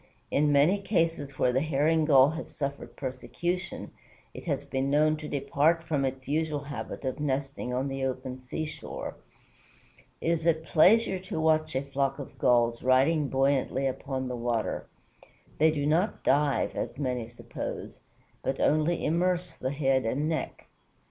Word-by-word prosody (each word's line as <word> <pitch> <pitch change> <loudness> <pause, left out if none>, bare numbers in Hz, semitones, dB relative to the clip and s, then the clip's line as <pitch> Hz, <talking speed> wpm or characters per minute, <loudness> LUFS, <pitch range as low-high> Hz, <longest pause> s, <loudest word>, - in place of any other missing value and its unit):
In 145 +1 +3
many 155 +8 +4
cases 165 -8 0
where 125 - +2
the 130 - +2
Herring 155 +1 +2
Gull 140 -1 +6
has 160 +1 -6
suffered 140 -1 -4
persecution, 170 +7 -4 0.4
it - - -9
has 140 -4 -1
been 135 -1 -2
known 155 +2 +3
to 150 0 -7
depart 145 +4 +1
from 150 -4 0
its 130 0 -4
usual 150 0 0
habit 140 0 -6
of 130 +3 -2
nesting 135 -2 -2
on 130 +2 -1
the 135 0 -3
open 130 0 -3
seashore. 155 +5 -6 1.0
It 165 - 0
is 165 0 0
a 165 - +5
pleasure 185 +6 +4
to 185 -3 -5
watch 155 -2 +2
a 130 - 0
flock 140 0 -1
of 140 - -9
Gulls 120 -1 +3
riding 135 +4 +3
buoyantly 135 0 +1
upon 130 0 -2
the 125 - -3
water. 120 -2 -2 0.7
They 160 +1 +6
do 145 -2 -1
not 170 +8 +1
dive, 140 +1 +2
as - - -4
many 125 -5 -2
suppose, 120 +1 -7 0.4
but - - -2
only 155 +3 +2
immerse 180 +3 +1
the 130 - -3
head 135 -2 +1
and 140 +6 0
neck. 160 -1 -3
145 Hz, 155 wpm, -28 LUFS, 130-160 Hz, 1.0 s, Gull